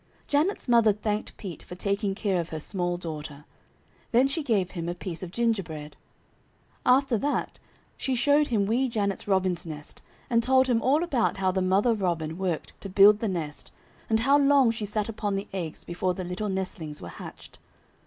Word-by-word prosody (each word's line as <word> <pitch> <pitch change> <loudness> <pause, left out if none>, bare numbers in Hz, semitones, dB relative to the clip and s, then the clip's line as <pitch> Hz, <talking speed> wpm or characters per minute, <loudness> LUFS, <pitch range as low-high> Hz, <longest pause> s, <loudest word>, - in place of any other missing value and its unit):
Janet's 305 +6 +1
mother 230 -3 +5
thanked 210 +1 -3
Pete 190 -6 -7
for 180 - -10
taking 200 +1 -1
care 195 -4 0
of 165 - -8
her 160 - -4
small 175 +1 -1
daughter. 150 -4 -7 0.7
Then 250 +3 +5
she 300 +4 -2
gave 205 -10 0
him 170 -2 -4
a 175 - -3
piece 180 -2 -5
of 185 - -5
gingerbread. 175 -9 -2 0.9
After 255 -2 +4
that 290 +5 -2 0.4
she 265 - -1
showed 290 +4 +3
him 210 -5 +1
Wee 245 +5 +1
Janet's 200 -4 -2
robin's 185 -3 +1
nest 150 -2 -8 0.3
and 230 -1 +3
told 260 +2 +4
him 240 -3 +1
all 290 +6 +3
about 260 -11 0
how 190 -1 +1
the 190 0 0
mother 195 +6 +3
robin 170 -5 -2
worked 180 -4 -2
to 195 - -6
build 200 +2 +7
the 225 - -1
nest, 160 -6 -4 0.4
and 220 0 +2
how 275 +4 +4
long 275 -4 +5
she 220 -2 -4
sat 210 0 -1
upon 210 -2 -2
the 195 +1 -3
eggs 170 -5 -4
before 180 +1 -2
the 185 - -4
little 180 +4 -3
nestlings 180 -5 -3
were - - -8
hatched. 80 - -11
200 Hz, 185 wpm, -27 LUFS, 175-235 Hz, 0.9 s, build